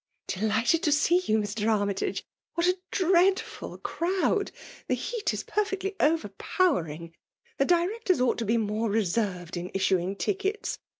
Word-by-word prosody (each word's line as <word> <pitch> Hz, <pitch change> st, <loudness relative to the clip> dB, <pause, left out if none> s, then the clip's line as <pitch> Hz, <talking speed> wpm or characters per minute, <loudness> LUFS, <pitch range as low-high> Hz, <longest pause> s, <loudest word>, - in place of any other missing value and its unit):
• -, -, -3 dB
•' -, -, -6 dB
Delighted 225 Hz, +9 st, +2 dB
to 300 Hz, -, +2 dB
see 315 Hz, +4 st, +4 dB
you, 215 Hz, -, +2 dB
Mr. 210 Hz, 0 st, -1 dB
Armytage. 200 Hz, -2 st, -1 dB
— -, -, -68 dB
What 340 Hz, 0 st, +1 dB
a 365 Hz, +1 st, +2 dB
dreadful 375 Hz, +1 st, +1 dB
crowd! 380 Hz, +4 st, 0 dB, 0.2 s
— -, -, -18 dB
The -, -, +2 dB
heat 470 Hz, -3 st, -2 dB
is -, -, -4 dB
per 425 Hz, -, +1 dB
fectly 390 Hz, -1 st, -4 dB
overpowering. 195 Hz, -, 0 dB, 0.5 s
The 275 Hz, -, +4 dB
directors 365 Hz, -, +2 dB
ought 250 Hz, -1 st, +2 dB
to 230 Hz, -, -1 dB
be 225 Hz, +3 st, +2 dB
more 215 Hz, +1 st, 0 dB
reserved 185 Hz, -4 st, -1 dB
in 175 Hz, +1 st, -4 dB
issuing 190 Hz, 0 st, +1 dB
tickets. 405 Hz, -, -2 dB
250 Hz, 165 wpm, -27 LUFS, -, 0.5 s, see